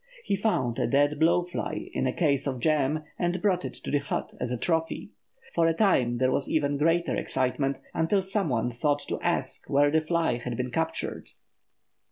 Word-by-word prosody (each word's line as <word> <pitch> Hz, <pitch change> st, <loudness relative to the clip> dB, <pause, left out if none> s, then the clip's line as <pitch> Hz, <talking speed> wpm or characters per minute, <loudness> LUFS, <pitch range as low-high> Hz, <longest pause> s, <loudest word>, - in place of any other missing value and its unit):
He 200 Hz, -, 0 dB
found 130 Hz, -, 0 dB
a -, -, +1 dB
dead 145 Hz, +4 st, +2 dB
blow 170 Hz, +2 st, +4 dB
fly 175 Hz, 0 st, -5 dB
in -, -, 0 dB
a -, -, +1 dB
case 140 Hz, -2 st, +1 dB
of 130 Hz, -2 st, -2 dB
jam 150 Hz, +2 st, +1 dB, 0.2 s
and 175 Hz, 0 st, 0 dB
brought 185 Hz, -2 st, +1 dB
it -, -, -6 dB
to -, -, -7 dB
the 145 Hz, -, +3 dB
hut 140 Hz, -, -4 dB
as 125 Hz, -, -2 dB
a 125 Hz, -, -2 dB
trophy. 165 Hz, +5 st, -1 dB, 0.4 s
For 165 Hz, -1 st, +3 dB
a 165 Hz, -, +2 dB
time 130 Hz, -, +3 dB
there 130 Hz, +1 st, +2 dB
was 135 Hz, -, 0 dB
even 145 Hz, -2 st, +1 dB
greater 165 Hz, -1 st, +2 dB
excitement, 135 Hz, +1 st, 0 dB
until 190 Hz, +4 st, +1 dB
some 195 Hz, -2 st, -1 dB
one 120 Hz, -1 st, 0 dB
thought 145 Hz, +5 st, 0 dB
to -, -, -3 dB
ask -, -, -1 dB
where 145 Hz, +1 st, +4 dB
the 160 Hz, +1 st, +3 dB
fly 160 Hz, -5 st, 0 dB
had 120 Hz, -1 st, -4 dB
been 125 Hz, 0 st, -2 dB
captured. 165 Hz, +5 st, -2 dB
150 Hz, 200 wpm, -27 LUFS, 130-170 Hz, 0.4 s, blow